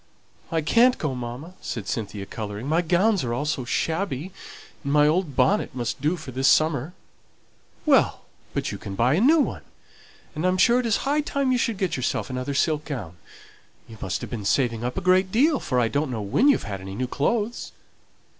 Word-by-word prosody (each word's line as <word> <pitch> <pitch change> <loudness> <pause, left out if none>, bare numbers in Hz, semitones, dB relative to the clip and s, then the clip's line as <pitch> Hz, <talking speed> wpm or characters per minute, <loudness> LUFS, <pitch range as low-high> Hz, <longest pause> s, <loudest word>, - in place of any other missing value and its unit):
"I 165 -1 +1
can't 235 +11 +4
go, 150 -4 -2
mamma," 125 +7 -6
said 110 -4 -5
Cynthia, 100 -1 -4
colouring. 105 +2 -6
"My 160 +4 +2
gowns 185 +3 +2
are 120 -1 -2
all 145 - -2
so 140 -4 -2
shabby, 160 +4 -2 0.5
and 140 - -2
my 150 0 +5
old 160 -2 0
bonnet 205 -9 +2
must 120 0 -3
do 155 +5 +1
for 155 -5 -8
the 130 +2 -4
summer." 155 +1 +3 0.9
"Well, - - +3 0.3
but - - -1
you - - -6
can 95 - -7
buy 120 +6 +3
a 170 - +2
new 300 +7 +6
one; 285 - -1 0.7
and 155 0 -4
I'm 185 0 +2
sure 240 +6 +5
it 245 - -1
is 225 - 0
high 290 +2 +2
time 280 -3 -1
you 250 - +2
should 230 -3 0
get 190 -6 -1
yourself 130 +1 -2
another 130 +2 -3
silk 150 +1 +1
gown. 105 - -6 0.7
You 110 -2 -12
must 95 - -3
have - - -7
been 115 -4 -4
saving 115 +1 +1
up 125 +1 -3
a - - -1
great 185 +1 +3
deal, 280 +7 +3
for 125 -3 -1
I 120 - +3
don't 145 +4 -1
know 115 -4 -3
when 100 - +2
you've 285 - +4
had 100 -3 -5
any 95 +1 -7
new 130 - -1
clothes." 215 - -1
150 Hz, 205 wpm, -24 LUFS, 120-190 Hz, 0.9 s, new